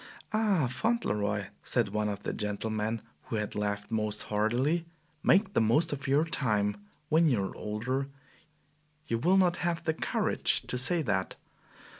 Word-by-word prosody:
"Ah, 210 -8 +2
Fauntleroy," 105 - -1
said 120 -5 0
one 105 +1 -1
of 100 - -5
the - - -2
gentlemen 110 +1 -2 0.2
who - - -4
had 105 -1 -2
laughed 105 0 -3
most 105 -1 -1
heartily, 125 +11 0 0.3
"make 195 +2 +3
the - - +3
most 145 +9 +3
of 140 0 -5
your 145 +4 +3
time! 105 -10 0 0.3
When 160 +1 +4
you 115 -7 +1
are - - -6
older 125 +6 -2 1.0
you 115 -6 -1
will 180 +9 +4
not 180 -2 +3
have 170 -1 -1
the 160 -1 +1
courage - - 0
to 125 - -1
say 165 +5 +5
that." 95 -6 -1
120 Hz, 155 wpm, -30 LUFS, 105-160 Hz, 1.0 s, say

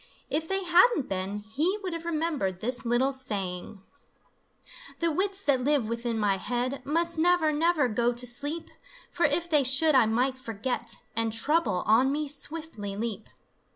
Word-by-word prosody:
If 320 +1 0
they 385 +1 -1
hadn't 360 - +4
been, 195 +2 -3
he 300 - -1
would 365 -2 -3
have 335 0 -6
remembered 305 - -1
this 245 +2 -2
little 245 +3 +2
saying: 200 -6 -4 1.1
The 335 -1 +1
wits 390 +4 -1
that 265 -6 +2
live 285 -4 +2
within 235 0 -2
my 205 -2 +1
head 245 +6 -3
Must 335 +2 0
never, 345 -2 +3
never 315 -2 +2
go 235 +1 +1
to 245 +1 0
sleep, 290 +7 -2 0.4
For - - +2
if 340 0 0
they 300 -4 +3
should 275 +5 +3
I 255 -5 +5
might 255 +4 0
forget 230 0 -3 0.2
And 230 -1 +1
Trouble 230 - +1
on 235 +6 +4
me 300 +1 -1
swiftly 285 -8 -4
leap. 220 -1 -4
260 Hz, 160 wpm, -27 LUFS, 225-320 Hz, 1.1 s, I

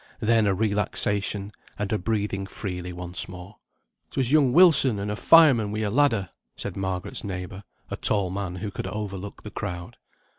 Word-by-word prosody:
Then 110 -1 +3
a 95 - +2
relaxation, 105 0 0 0.3
and 105 0 -2
a 110 - +1
breathing 100 -1 -2
freely 90 -3 -5
once 90 0 -3
more. 90 +3 -11 0.5
"'Twas 130 -2 -1
young 145 -4 +4
Wilson 145 - +5
and 100 +1 -3
a - - -2
fireman 130 -7 +5
wi' 110 +1 -2
a 105 -2 -1
ladder," 115 - +2 0.3
said - - -5
Margaret's 95 -2 -3
neighbour, 95 0 -6 0.3
a - - -3
tall 100 -4 +1
man 95 -2 -4
who 100 +3 -5
could 95 - -5
overlook 100 -1 -6
the 105 - -8
crowd. 90 -4 -6
100 Hz, 170 wpm, -25 LUFS, 95-110 Hz, 0.5 s, Wilson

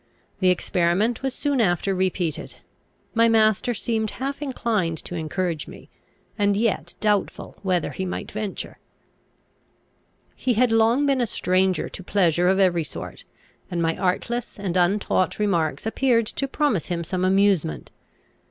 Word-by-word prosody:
The 185 -1 +4
experiment 180 +5 +1
was 270 0 -1
soon 285 -4 0
after 195 -1 +1
repeated. 180 -4 -2 0.6
My 230 0 +4
master 220 +2 +3
seemed 220 0 -1
half 275 +3 -4
inclined 220 - -1
to - - -7
encourage 165 -1 -2
me, - - -13 0.5
and 200 -1 +2
yet 225 -1 -1
doubtful 210 -2 -1
whether 185 -4 0
he 190 - -4
might 185 - -4
venture. 210 -2 -5 1.6
He 250 -2 0
had 245 +1 +3
long 225 +5 +3
been 275 -2 +2
a 240 - +1
stranger 185 -2 +1
to 190 - -9
pleasure 175 -2 +2
of 190 +1 +3
every 180 -4 +3
sort, 150 - -8 0.4
and 175 - -2
my 165 -1 +1
artless 235 +6 -2
and 195 -3 -3
untaught 185 +1 +1
remarks 175 -7 0
appeared 230 0 +2
to 275 +5 -3
promise 270 - 0
him 170 -1 -2
some 180 +2 -2
amusement. 190 - +2
195 Hz, 145 wpm, -24 LUFS, 180-230 Hz, 1.6 s, The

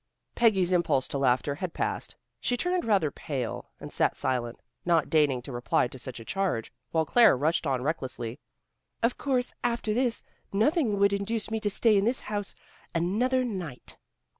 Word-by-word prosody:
Peggy's 195 -6 +3
impulse 170 -7 +2
to 140 - -2
laughter 130 +1 +2
had 170 +4 -5
passed. - - -2 0.2
She 245 - 0
turned 355 +5 0
rather 195 -9 +2
pale, 130 -7 -4
and - - -8
sat - - +2
silent, 120 -2 -1 0.2
not 170 -3 +2
deigning 145 -6 +3
to 135 - -8
reply 120 0 +1
to 130 - -9
such 125 0 -6
a 115 - -10
charge, 190 -12 -1 0.2
while 160 -1 +1
Claire 230 - +6
rushed 155 +3 +1
on 130 -2 0
recklessly. 130 -5 -3 0.6
"Of 235 +2 +3
course, 255 -3 0
after 235 -2 0
this, 245 0 +1 0.3
nothing 225 - +2
would 200 0 +4
induce 215 +2 -2
me 220 - 0
to 210 - 0
stay 215 +2 +3
in 195 - +2
this 240 +3 +1
house 205 -1 -3 0.4
another 235 +10 +2
night." 180 - -6
185 Hz, 170 wpm, -28 LUFS, 135-225 Hz, 0.6 s, Claire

